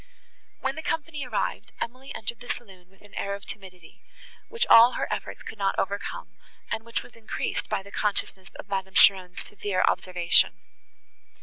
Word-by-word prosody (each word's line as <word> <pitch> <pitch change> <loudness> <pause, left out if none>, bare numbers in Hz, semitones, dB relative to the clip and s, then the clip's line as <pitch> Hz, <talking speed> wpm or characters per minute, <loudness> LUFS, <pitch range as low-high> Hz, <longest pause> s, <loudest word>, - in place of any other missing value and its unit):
When 270 - 0
the 315 - -5
company 305 -4 -3
arrived, 215 -2 -2
Emily 255 +3 -5
entered 225 +1 -3
the 245 - -11
saloon 190 -6 -6
with 195 +1 -24
an 205 - -17
air 200 0 -2
of 200 - -11
timidity, 185 -4 -11 0.5
which 465 +1 +1
all 235 - +8
her - - -1
efforts - - -5
could 220 - -9
not 195 -1 +1
overcome, 200 +1 -3 0.3
and 220 - -1
which 230 0 -3
was - - -16
increased 225 -2 -3
by 195 - -1
the 200 - -13
consciousness 195 -3 -1
of - - -9
Madame 190 -1 -3
Cheron's 185 -2 +6
severe 205 -2 -1
observation. 180 -2 +3
200 Hz, 170 wpm, -27 LUFS, 190-235 Hz, 0.5 s, all